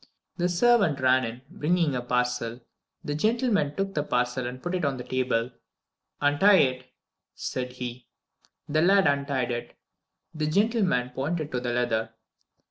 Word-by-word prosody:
The 175 0 +1
servant 185 -5 +3
ran 130 0 +4
in, 115 +1 -5
bringing 170 -4 0
a 125 - -1
parcel. 125 -1 -1 0.4
The 145 - -2
gentleman 210 - +1
took 195 0 -2
the 150 - 0
parcel 125 -2 -1
and 125 +1 -6
put 175 +7 -4
it 180 -1 -1
on 140 -2 0
the 125 - -6
table. 125 -2 -1 0.7
"Untie 145 +8 +5
it," 130 -6 +1 0.5
said 125 -1 -4
he. 125 -1 -7 0.6
The 155 +2 +1
lad 195 +3 +5
untied 140 -3 0
it. 120 0 -5 0.6
The 155 -1 -2
gentleman 185 - +1
pointed 150 +4 -3
to 125 - -1
the 120 -1 -3
leather. 115 -2 -1
140 Hz, 150 wpm, -26 LUFS, 125-175 Hz, 0.7 s, Untie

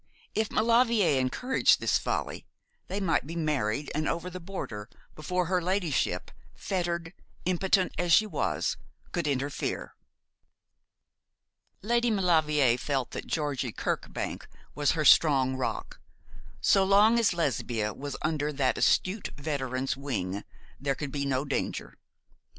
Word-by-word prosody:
If 220 0 0
Maulevrier 230 - +3
encouraged 250 - +2
this - - +2
folly, - - -3 0.4
they 195 - -3
might 165 -8 +1
be 165 - -6
married 145 -5 -1
and 155 +1 0
over 180 +2 -3
the 185 - -6
border, 145 - -6 0.2
before 180 +4 -1
her 180 +1 +1
ladyship 175 -6 -1 0.2
fettered, 170 -2 -2 0.3
impotent 185 +1 +2
as 175 -1 0
she 215 +6 +6
was 210 - -1 0.3
could 170 -4 -1
interfere. 140 0 -2 1.9
Lady 235 +2 +2
Maulevrier 155 - +3
felt 135 -3 -2
that - - -6
Georgie 145 -6 -1
Kirkbank - - -3 0.3
was 145 -1 +1
her 155 -2 -1
strong 135 -4 +5
rock. 130 - -4 0.6
So 195 - +4
long 205 +4 +5
as 230 - +3
Lesbia 120 - -1
was 140 +1 -6
under 150 -1 0
that 135 -2 +1
astute 195 +3 +2
veteran's 135 -4 -2
wing 105 -8 -3 0.4
there 140 0 -1
could 145 +1 -5
be 140 0 -2
no 135 +1 0
danger. 140 - -3
155 Hz, 130 wpm, -28 LUFS, 135-185 Hz, 1.9 s, she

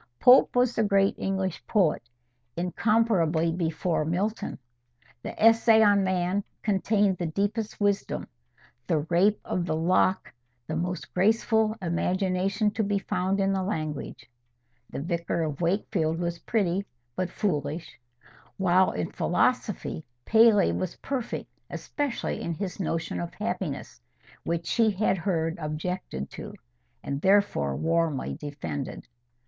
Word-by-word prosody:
Pope 250 +1 +6
was 245 -1 +3
the - - 0
great 200 -1 +3
English 190 -2 -2
poet, 185 -8 +2 0.6
incomparably 175 -3 +2
before 165 -1 -1
Milton. 190 +8 -2 0.6
The - - -7
"Essay 225 0 +6
on 205 -1 +4
Man" 185 +1 0 0.2
contained 200 -1 +1
the 175 - -1
deepest 205 +6 -2
wisdom; 205 -1 0 0.6
the 155 -2 +2
"Rape 200 +5 +4
of 180 - -1
the 155 - 0
Lock" 185 +3 +1 0.3
the 155 - -4
most 180 +2 -3
graceful 220 +2 +2
imagination 185 +4 0
to 220 +1 -1
be 200 0 0
found 190 0 -1
in 195 0 +2
the 190 - 0
language. 155 - -4 0.6
The 140 - -5
"Vicar 170 0 -1
of 150 -1 -4
Wakefield" 170 -2 0
was 170 0 -3
pretty, 195 -3 0 0.3
but 185 -1 -1
foolish; 160 -6 -3 0.6
while 185 0 +4
in 90 - -3
philosophy, 80 - 0 0.2
Paley 220 -2 +5
was 185 -2 -3
perfect, 265 -4 -4 0.2
especially 290 -4 -3
in 170 - -3
his 195 +2 -5
notion 165 - -2
of 85 - -5
happiness, - - -4 0.4
which 170 0 -2
she 225 +4 +3
had 195 -2 +1
heard 165 -2 -1
objected 155 - -4
to, - - -8 0.5
and 140 0 -3
therefore 190 - +2
warmly 165 -4 0
defended. 140 - -6
185 Hz, 125 wpm, -27 LUFS, 165-205 Hz, 0.6 s, Pope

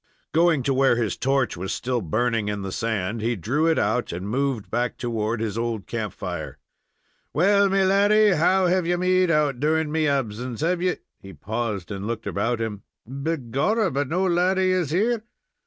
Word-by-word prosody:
Going 165 -4 +3
to 135 - +1
where 130 -1 +3
his 115 -3 -1
torch 135 -1 0
was 95 +2 -4
still 125 -1 -2
burning 115 +4 0
in 105 -1 -3
the 95 - -4
sand, 110 0 -2
he 115 +2 0
drew 135 - 0
it 165 - +2
out 110 +4 0
and 90 +3 -5
moved 120 -4 -2
back 120 +1 -1
toward 115 -1 -2
his 110 0 -2
old 115 -4 -2
camp 110 -4 -3
fire. - - -6 0.8
"Well, 200 +4 +4
me 195 0 +2
laddy, 205 +3 +4
how 185 +2 +3
have 180 -1 +1
you 175 0 +1
made 185 0 +2
out 150 -5 +1
during 155 +1 +1
me 160 0 +1
absince? 125 -3 -2
Have 175 +2 0
you 180 0 0
" - - -57
He 95 0 -11
paused 105 +2 -4
and 100 +1 -4
looked 115 -1 -4
about 100 +5 -1
him. 110 -3 -4 0.3
"Begorrah, 140 - -1
but 140 0 -1
no 185 +4 +1
laddy 185 +1 +2
is 180 -5 0
here. 215 +8 +1
130 Hz, 190 wpm, -24 LUFS, 110-175 Hz, 0.8 s, Well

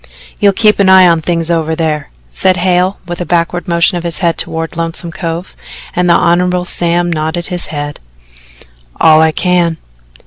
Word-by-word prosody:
"You'll 200 -2 +3
keep 210 +1 +2
an 195 -1 +4
eye 190 -1 +7
on 165 -2 +2
things 165 +1 -1
over 160 -1 0
there?" 155 -3 -2 0.2
said 185 - +1
Hale 180 +2 +1
with 175 0 -5
a - - 0
backward 175 +2 -1
motion 170 +1 +2
of - - -9
his 170 -3 -3
head 170 -3 0
toward 165 0 -2
Lonesome 165 +1 -4
Cove, 170 0 -5 0.4
and 180 0 +1
the 170 - +5
Hon. 180 +1 +1
Sam 175 0 0
nodded 160 +2 -3
his 180 -2 -2
head: 145 -1 -5 1.0
"All 160 -1 +5
I 160 0 +3
can." 175 0 0
170 Hz, 175 wpm, -12 LUFS, 165-180 Hz, 1.0 s, eye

